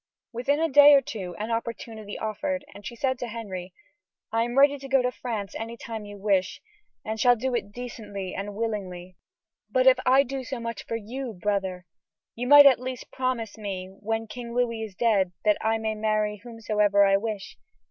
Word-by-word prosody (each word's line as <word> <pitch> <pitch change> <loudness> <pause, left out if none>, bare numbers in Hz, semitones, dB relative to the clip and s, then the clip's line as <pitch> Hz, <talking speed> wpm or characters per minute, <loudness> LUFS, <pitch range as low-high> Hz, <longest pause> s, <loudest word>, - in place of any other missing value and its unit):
Within 260 +5 0
a 325 - +2
day 290 0 +8
or 275 - +5
two 185 -7 -6
an 215 +2 -4
opportunity 225 -2 -5
offered, 275 +7 -3
and 205 - -9
she 235 - -7
said 260 +1 -1
to 245 - -4
Henry: 195 -6 -6 0.6
"I 225 +1 +1
am 240 +2 -2
ready 285 +1 +5
to 270 - -8
go 265 -1 +3
to 250 - +1
France 225 -6 -5
any 230 +1 -6
time 225 -3 -7
you 205 0 -9
wish, 195 -2 0 0.5
and 220 +1 -3
shall 245 +2 +5
do 255 +2 -2
it 205 -4 -2
decently 205 -5 -7
and 200 +1 -5
willingly; 185 -5 -4 0.5
but 255 +4 +2
if 260 -1 +6
I 265 +2 +5
do 270 0 -5
so 255 0 -5
much 230 -2 -6
for 230 - -2
you, 235 +3 -5
brother, 190 -3 -2 0.5
you 245 +2 -4
might 290 +1 +10
at 265 -4 +7
least 255 -1 -6
promise 235 -4 -2
me 190 -3 -5
that 195 - -19
when 225 +1 -1
King 235 +1 -8
Louis 235 -2 0
is 215 -4 -6
dead 200 -6 +2 0.3
I 225 0 +1
may 220 0 -2
marry 215 -1 0
whomsoever 210 -3 +1
I 195 0 +4
wish. 210 - -5
225 Hz, 195 wpm, -26 LUFS, 205-250 Hz, 0.6 s, might